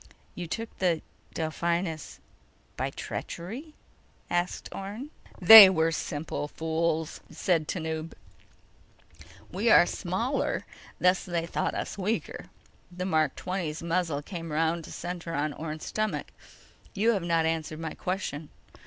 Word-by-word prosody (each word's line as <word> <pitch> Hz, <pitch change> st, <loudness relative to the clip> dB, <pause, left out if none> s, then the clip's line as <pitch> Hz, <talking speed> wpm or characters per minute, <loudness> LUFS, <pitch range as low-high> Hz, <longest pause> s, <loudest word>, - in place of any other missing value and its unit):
"You 175 Hz, -, -6 dB
took 225 Hz, +7 st, -5 dB
the 175 Hz, -4 st, +1 dB, 0.3 s
Delphinus 165 Hz, 0 st, -2 dB, 0.6 s
by -, -, -1 dB
treachery?" 250 Hz, -, -6 dB, 0.6 s
asked 175 Hz, +1 st, -1 dB
Orne. 210 Hz, +9 st, -6 dB, 0.3 s
"They 200 Hz, +2 st, +12 dB
were 165 Hz, -3 st, +2 dB
simple 150 Hz, -1 st, -3 dB
fools," 160 Hz, 0 st, -1 dB
said 165 Hz, -5 st, 0 dB
Tanub. 160 Hz, -2 st, -3 dB, 1.4 s
"We -, -, +1 dB
are -, -, +8 dB
smaller, -, -, -2 dB, 0.3 s
thus 180 Hz, +1 st, +3 dB
they 170 Hz, -2 st, -2 dB
thought -, -, -2 dB
us -, -, -4 dB
weaker." 210 Hz, +4 st, -2 dB, 0.5 s
The 180 Hz, +1 st, -4 dB
Mark 155 Hz, -6 st, +1 dB
XX's 170 Hz, -4 st, -4 dB
muzzle 165 Hz, -4 st, -1 dB
came 165 Hz, -2 st, -6 dB
around 160 Hz, +1 st, 0 dB
to -, -, -10 dB
center 175 Hz, -1 st, -5 dB
on 145 Hz, +1 st, -1 dB
Orne's 155 Hz, 0 st, -6 dB
stomach. 215 Hz, 0 st, -2 dB, 0.6 s
"You 220 Hz, +4 st, +3 dB
have 200 Hz, -4 st, 0 dB
not 165 Hz, -1 st, +2 dB
answered 160 Hz, -1 st, -2 dB
my 160 Hz, -1 st, -4 dB
question. 170 Hz, -5 st, -4 dB
170 Hz, 125 wpm, -28 LUFS, 160-185 Hz, 1.4 s, They